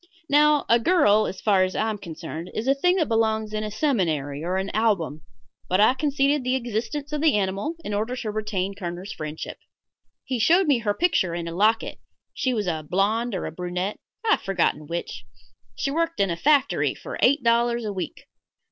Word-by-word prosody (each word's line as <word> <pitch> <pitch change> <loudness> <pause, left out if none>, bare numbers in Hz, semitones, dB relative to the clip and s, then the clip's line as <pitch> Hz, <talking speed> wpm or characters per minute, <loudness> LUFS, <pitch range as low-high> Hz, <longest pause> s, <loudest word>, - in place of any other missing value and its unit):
Now, 295 0 +4
a 235 - +5
girl, 230 - +4
as 190 - -6
far 195 -3 +4
as 185 0 -2
I 220 - 0
am 215 -2 -3
concerned, 170 -1 -7
is 225 - -3
a 270 - +5
thing 360 +6 +2
that 330 -6 +1
belongs 220 -1 0
in 215 0 -2
a 215 - -3
seminary 165 - -1
or 180 +2 -1
an 190 +1 -2
album; 200 -9 0 0.5
but 185 - +2
I 215 +4 +6
conceded 280 0 +1
the 255 +1 +1
existence 250 +5 -3
of 300 - -1
the 310 -5 +4
animal 200 - -1
in 210 - -3
order 220 +5 -1
to 225 -4 -4
retain 210 -3 -2
Kerner's 180 0 -6
friendship. 155 0 -6 0.7
He 255 -2 -2
showed 345 - +4
me 285 -6 +3
her 205 -3 -1
picture 190 - +1
in 170 -1 -4
a 165 - -5
locket 215 +5 +1 0.3
she 260 - -1
was 215 -4 -1
a 160 -3 -1
blonde 215 +5 +1
or 185 - -3
a - - -4
brunette 180 +4 -3 0.3
I 440 - +3
have - - +3
forgotten 170 -5 0
which. 170 +2 -5 0.5
She 275 - -2
worked 330 +2 -1
in 195 -3 +2
a - - -1
factory 280 - +2
for - - -8
eight 280 +1 +4
dollars 235 0 +2
a 210 - -3
week. 190 - -6
215 Hz, 200 wpm, -24 LUFS, 185-265 Hz, 0.7 s, I